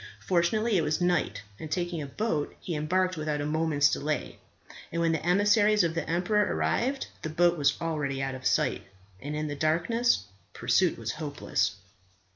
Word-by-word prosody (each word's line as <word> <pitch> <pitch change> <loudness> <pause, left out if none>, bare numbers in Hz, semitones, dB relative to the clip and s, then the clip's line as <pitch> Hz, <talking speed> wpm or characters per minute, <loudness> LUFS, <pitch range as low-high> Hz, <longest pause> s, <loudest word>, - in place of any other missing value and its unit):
Fortunately 200 +5 +2
it - - +3
was 150 +2 0
night, 175 - 0 0.2
and 155 - -7
taking 175 0 -2
a 145 - -5
boat 155 -2 -2
he 175 - -5
embarked 185 +4 0
without 150 -1 -2
a 145 - -2
moment's 150 -2 +2
delay; 150 +1 -2 0.5
and 170 - -2
when 165 -1 +2
the 160 - -1
emissaries 205 +3 +4
of 165 -1 0
the 165 - -3
emperor 185 +5 +2
arrived 265 +3 0 0.2
the 155 - -4
boat 175 +2 +3
was 140 -3 +1
already 150 -5 -2
out 135 0 -2
of 130 -1 -2
sight, - - +1 0.4
and 145 +2 -4
in 155 0 -2
the 145 - -4
darkness 170 - +1 0.3
pursuit 185 -2 +2
was 115 -1 -3
hopeless. 150 0 -2
165 Hz, 175 wpm, -28 LUFS, 150-185 Hz, 0.5 s, emissaries